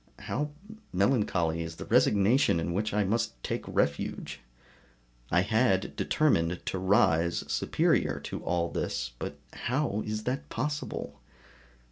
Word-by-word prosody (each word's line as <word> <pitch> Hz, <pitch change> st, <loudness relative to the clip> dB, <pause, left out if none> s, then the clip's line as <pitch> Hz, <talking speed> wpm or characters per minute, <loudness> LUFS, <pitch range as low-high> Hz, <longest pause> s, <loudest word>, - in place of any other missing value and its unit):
How 150 Hz, +3 st, -2 dB, 0.4 s
melancholy 90 Hz, -6 st, +1 dB
is 80 Hz, 0 st, -5 dB
the -, -, -7 dB
resignation 105 Hz, -, +4 dB
in 85 Hz, +1 st, -2 dB
which 105 Hz, +4 st, -1 dB
I 105 Hz, 0 st, +2 dB
must 110 Hz, -, 0 dB
take -, -, -2 dB
refuge! 70 Hz, 0 st, -1 dB, 0.9 s
I 90 Hz, -, +4 dB
had 105 Hz, -1 st, +1 dB
determined 90 Hz, -, +1 dB
to 95 Hz, -, -2 dB
rise 85 Hz, -3 st, +3 dB
superior -, -, +1 dB
to -, -, -6 dB
all 85 Hz, -1 st, 0 dB
this, 65 Hz, -, -2 dB
but -, -, -5 dB, 0.2 s
how 120 Hz, -5 st, -1 dB
is 110 Hz, 0 st, -3 dB
it 130 Hz, +2 st, -2 dB
possible? 150 Hz, 0 st, -4 dB
100 Hz, 125 wpm, -29 LUFS, 85-115 Hz, 0.9 s, resignation